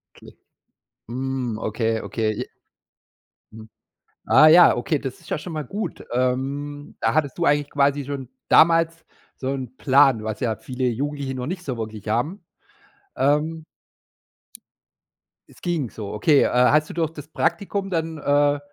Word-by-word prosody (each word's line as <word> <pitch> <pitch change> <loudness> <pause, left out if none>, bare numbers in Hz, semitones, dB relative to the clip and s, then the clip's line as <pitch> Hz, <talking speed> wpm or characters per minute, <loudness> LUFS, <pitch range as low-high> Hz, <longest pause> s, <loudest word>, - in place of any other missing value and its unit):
Okay. - - -14 0.8
Mhm, 130 -2 -3
okay, 110 0 -1
okay. 110 -2 -2
Je - - -2 1.1
Mhm. 110 0 -12 0.6
Ah 135 +8 +7
ja, 170 +3 +7
okay, 140 +5 -1
das 135 -1 -6
ist - - -16
ja - - -1
schon 160 +3 -8
mal 155 -1 -3
gut. 205 - -5
Ähm, 140 +4 -2
da - - +1
hattest 145 -4 0
du 170 - 0
eigentlich 145 0 +2
quasi 140 0 +1
schon 135 -2 -6 0.2
damals 165 0 +4 0.3
so 130 - -5
'n 130 -2 -6
Plan, 135 -4 +4
was 110 -1 -4
ja 115 -3 -1
viele 125 +4 -4
Jugendliche 140 +3 -3
noch 125 0 -4
nicht 180 +2 -5
so 130 -7 -4
wirklich 110 -2 -7
haben. 145 - -1 0.7
Ähm 150 +4 +1 1.8
Es - - -20
ging 165 -8 -1
so, 105 -2 -7
okay. 140 +7 +3
Äh, - - +1
hast 145 +5 +3
du - - -7
durch 160 -2 -1
das 150 -2 -11
Praktikum 200 +3 -1
dann, 165 -2 -2
äh, 145 0 +2
140 Hz, 155 wpm, -23 LUFS, 125-155 Hz, 1.8 s, Ah